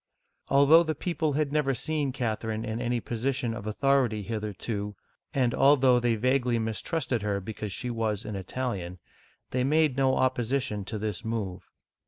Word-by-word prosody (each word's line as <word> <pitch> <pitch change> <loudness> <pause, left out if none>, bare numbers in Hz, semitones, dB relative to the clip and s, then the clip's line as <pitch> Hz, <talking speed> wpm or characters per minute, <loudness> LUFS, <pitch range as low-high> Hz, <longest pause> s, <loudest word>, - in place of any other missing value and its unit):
Although 140 +4 +7
the 160 -2 -1
people 160 -2 -1
had 150 0 0
never 145 -3 +1
seen 145 +2 -1
Catherine 110 -3 -2
in 110 +2 -3
any 120 0 0
position 120 +1 -2
of 115 -2 -6
authority 120 -2 +2
hitherto, 105 -1 -4 0.4
and 125 -3 +1
although 135 -3 +5
they 120 -1 +1
vaguely 125 +1 +1
mistrusted 115 - -1
her 100 -1 -1
because 105 +1 -6
she 125 +5 -4
was 110 -2 -2
an 105 -1 -4
Italian, 95 -3 -4 0.5
they 125 0 +1
made 150 0 +2
no 135 -1 +3
opposition 130 -4 0
to 110 +2 -4
this 105 -4 -3
move. 100 -5 -4
120 Hz, 155 wpm, -28 LUFS, 110-135 Hz, 0.5 s, Although